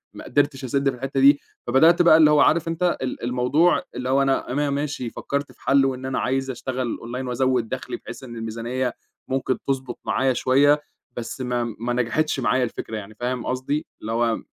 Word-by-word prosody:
ما - - -9
قدِرتش 145 0 0
أسِدّ 135 +2 +1
في 130 - -4
الحتَّة 135 +2 -3
دي، 140 +1 +6 0.3
فبدأت 160 +8 +5
بقى 170 -2 +7
اللي 155 -2 +6
هو 150 - +5
عارف 155 +3 +4
أنت 170 +2 0
ال 130 -2 -4
الموضوع 125 +8 +2
اللي 125 0 -3
هو 135 +1 +3
أنا 135 -2 0
أنا 145 +2 0
ماشي 140 -3 -2
فكَّرت 140 +4 -4
في - - -24
حلُّه 135 -1 +3
إن 130 +1 -8
أنا 130 -1 -1
عايز 135 +1 -1
أشتغل 125 0 -3
أونلاين 125 +3 -6
وأزوِّد 125 -2 0
دخلي، - - -4
بحيث - - -10
إن 120 -2 -9
الميزانية 115 +3 -3 0.4
ممكن 130 -1 0
تضبُط 130 -2 -2
معايا 130 0 +1
شوية، 145 +4 +3 0.4
بس 120 +2 -5
ما 125 -1 -1 0.2
ما 120 +1 -2
نجَحِتش 125 +5 0
معايا 125 +1 +2
الفكرة 115 -2 -4
يعني 105 +1 -9
فاهم 125 +2 -3
قصدي؟ 130 +4 -2 0.2
اللي 110 - -5
هو 115 0 +1
130 Hz, 195 wpm, -23 LUFS, 120-140 Hz, 0.4 s, بقى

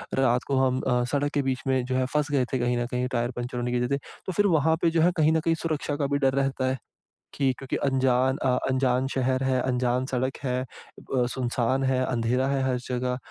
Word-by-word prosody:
रात 125 -2 +2
को 140 - 0
हम 130 -1 +2
अ, 125 0 +1
सड़क 145 0 0
के 145 - +2
बीच 130 -1 -1
में 130 -1 +2
जो 130 0 -2
है 130 - +2
फँस 150 -1 0
गए 130 -3 +2
थे 130 - +1
कहीं 120 0 +1
न 120 - 0
कहीं, 125 0 -1
टायर 120 0 -1
पंचरें 120 0 -4
होने 120 0 -2
की 125 - +1
वजह 125 - 0
से। - - -1 0.3
तो 190 - -2
फिर 205 +3 +3
वहाँ 160 +1 +3
पे 170 - +4
जो 165 0 +2
है 175 +2 +5
कहीं 155 0 +4
न 160 - +3
कहीं 165 +1 +1
सुरक्षा 155 -3 -2
का 145 -2 -1
भी 140 - 0
डर 135 -2 +2
रहता 135 -1 -1
है, 130 - -1 0.6
कि 135 -2 +1
क्योंकि 135 - -4
अनजान 130 0 +2
अ 125 -1 +2
अनजान 130 0 +1
शहर 130 0 +1
है, 130 -1 +1
अनजान 125 0 0
सड़क 130 0 -2
है, 125 -1 0 0.6
अ, 125 - +3
सुनसान 130 +1 0
है, 130 -1 +1
अंधेरा 125 +2 0
है 135 -1 0
हर 130 -1 +1
जगह, 125 0 -1
130 Hz, 245 wpm, -26 LUFS, 125-135 Hz, 0.6 s, है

